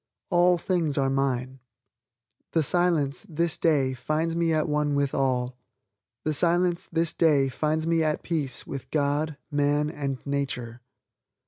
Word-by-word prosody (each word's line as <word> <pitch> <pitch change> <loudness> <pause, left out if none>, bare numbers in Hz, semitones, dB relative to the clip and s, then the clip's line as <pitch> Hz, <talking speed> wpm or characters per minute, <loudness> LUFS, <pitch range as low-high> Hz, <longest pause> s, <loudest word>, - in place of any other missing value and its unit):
All 175 0 +4
things 165 -4 0
are 135 -1 +2
mine. 130 -1 -1 0.9
The 160 - +3
Silence, 160 -4 +1
this 170 +1 0
day, 140 -5 +2
finds 155 +6 -1
me 170 -1 +1
at 155 -1 +1
one 150 -1 0
with 140 -1 0
all. 125 -2 0 0.6
The 155 - 0
Silence, 175 +2 +1
this 165 -1 0
day, 145 -5 +3
finds 155 +4 -1
me 165 0 +2
at 155 -1 -1
peace 150 -7 -2
with 130 -2 -7
God, 145 +1 0
Man 145 +1 +1
and 140 -4 -3
Nature. 130 -4 -3
150 Hz, 140 wpm, -26 LUFS, 135-165 Hz, 0.9 s, All